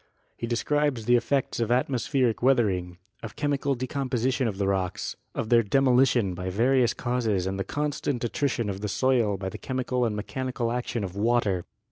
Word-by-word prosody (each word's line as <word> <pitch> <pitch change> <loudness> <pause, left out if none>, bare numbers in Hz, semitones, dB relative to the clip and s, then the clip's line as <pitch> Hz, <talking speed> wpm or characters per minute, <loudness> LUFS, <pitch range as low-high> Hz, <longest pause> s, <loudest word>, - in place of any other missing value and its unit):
He 115 - -4
describes 130 0 0
the 120 +1 +5
effects 120 +3 0
of 115 -2 0
atmospheric 125 -1 +1
weathering, 100 -9 +2 0.2
of 115 - -8
chemical 140 -1 0
decomposi 130 0 -1
tion 125 -1 0
of 100 -4 -3
the 100 - 0
rocks, 95 -2 -1 0.2
of 110 - -3
their 120 -1 +6
demolition 125 -3 +3
by 90 +1 -4
various 120 +4 +2
causes 115 -7 0
and 95 +1 -2
the - - 0
constant 145 +1 -2
attrition 120 -1 -1
of 100 -1 -4
the 105 - -2
soil 120 -4 +2
by 95 0 -4
the - - -8
chemical 125 -1 -1
and 110 -3 0
mechanical 125 +2 -3
action 120 -2 -2
of 95 -1 -5
water. 105 -4 +1
120 Hz, 175 wpm, -26 LUFS, 105-130 Hz, 0.2 s, their